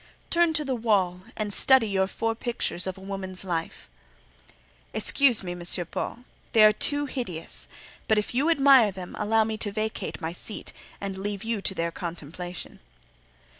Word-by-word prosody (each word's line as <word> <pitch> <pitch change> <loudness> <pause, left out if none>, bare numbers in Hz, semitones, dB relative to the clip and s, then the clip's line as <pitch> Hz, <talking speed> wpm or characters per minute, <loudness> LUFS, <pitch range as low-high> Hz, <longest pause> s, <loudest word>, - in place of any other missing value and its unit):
"Turn 340 -1 +3
to 305 -1 -1
the 270 - -1
wall 195 -6 0 0.2
and 210 -2 +1
study 265 -1 +6
your 190 -2 0
four 225 +3 -2
pictures 225 -6 -2
of 190 - -5
a - - -13
woman's 190 -1 -4
life." 165 -3 -4 1.1
"Excuse 260 -7 +4
me, 180 - -5
M. 175 0 -7 0.3
Paul; 245 - -5 0.3
they 220 -3 +6
are 215 0 +7
too 290 +6 +1
hideous: 235 - +1 0.4
but 220 - +3
if 210 - -1
you 275 +6 +2
admire 275 -8 +5
them, 185 -2 -9
allow 220 +1 +2
me 220 0 -4
to 205 - -1
vacate 215 +1 -4
my 160 -2 -4
seat 195 +5 -2 0.3
and 195 -1 -5
leave 205 +1 -4
you 225 -2 -2
to 190 - +1
their 170 -1 -2
contemplation." 175 +1 -7
210 Hz, 170 wpm, -26 LUFS, 185-235 Hz, 1.1 s, are